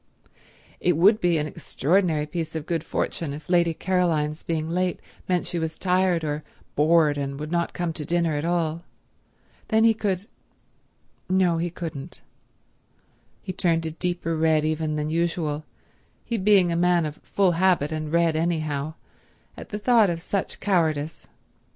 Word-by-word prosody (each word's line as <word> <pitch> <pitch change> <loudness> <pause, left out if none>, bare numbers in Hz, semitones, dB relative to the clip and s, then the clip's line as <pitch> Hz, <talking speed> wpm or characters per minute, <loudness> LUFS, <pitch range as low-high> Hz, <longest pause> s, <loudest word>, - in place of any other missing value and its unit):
It 175 -3 +2
would 205 +6 +5
be 175 -2 +3
an 150 - 0
extraordinary 155 +2 0
piece 160 +1 -4
of 155 -2 -3
good 165 -2 -1
fortune 160 -3 -3
if 150 +1 -9
Lady 170 -2 +2
Caroline's 165 -5 0
being 160 -2 -2
late 180 +2 -1 0.3
meant 180 -1 +1
she 175 - -3
was 160 0 -3
tired 180 -2 +2
or 150 0 -2 0.3
bored 150 -1 +3
and 140 0 -4
would 150 +1 -5
not 170 0 0
come 175 -2 -2
to 155 - -6
dinner 170 +1 +1
at 145 0 -2
all. 170 -1 -1 0.8
Then 220 0 +3
he 225 0 +6
could—no, 190 -3 -3
he 175 +1 -1
couldn't. 165 -3 -7 1.2
He 185 - -4
turned 165 -2 +1
a 160 - -2
deeper 170 0 -2
red 160 -1 +2
even 155 0 -1
than 150 0 -2
usual, 160 -2 -1 0.6
he 235 - -2
being 195 -4 +4
a - - 0
man 175 -1 +3
of 150 0 -5
full 195 -3 +1
habit 175 -4 +2
and 155 -1 -3
red 170 -1 +3
anyhow, 155 -2 -1 0.6
at - - -10
the 210 - -3
thought 225 -2 +4
of 170 -1 -2
such 190 +3 -3
cowardice. 160 -6 0
165 Hz, 155 wpm, -25 LUFS, 155-180 Hz, 1.2 s, he